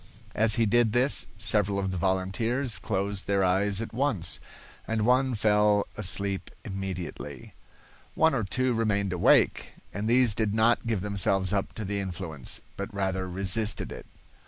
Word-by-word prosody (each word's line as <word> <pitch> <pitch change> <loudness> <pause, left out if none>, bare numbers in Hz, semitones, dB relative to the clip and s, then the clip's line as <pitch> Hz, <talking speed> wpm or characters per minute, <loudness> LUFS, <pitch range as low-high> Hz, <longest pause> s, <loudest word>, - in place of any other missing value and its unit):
As 110 0 +2
he 115 - +2
did 110 0 +2
this, 130 +3 +3
several 105 -1 +2
of 95 -1 -1
the 95 - -3
volunteers 95 +8 0
closed 100 -2 -3
their 100 -1 +2
eyes 95 +3 +1
at 115 - -9
once, 120 - -1 0.5
and 110 -1 -1
one 130 +1 +2
fell 105 -1 +3
asleep 95 0 -1 0.2
immediately. 90 -7 -6 0.6
One 160 -1 +3
or 120 -4 0
two 125 +6 0
remained 100 -4 0
awake, 90 - +3 0.2
and 105 +3 -3
these 125 -2 +4
did 105 0 -1
not 115 +1 +2
give 110 -5 -1
themselves 95 -1 +1
up 100 -1 -2
to 110 - -6
the 100 +1 -2
influence, 85 -7 -4 0.2
but 100 +3 -5
rather 95 -2 -2
resisted 100 +4 0
it. - - -9
100 Hz, 155 wpm, -27 LUFS, 95-115 Hz, 0.6 s, these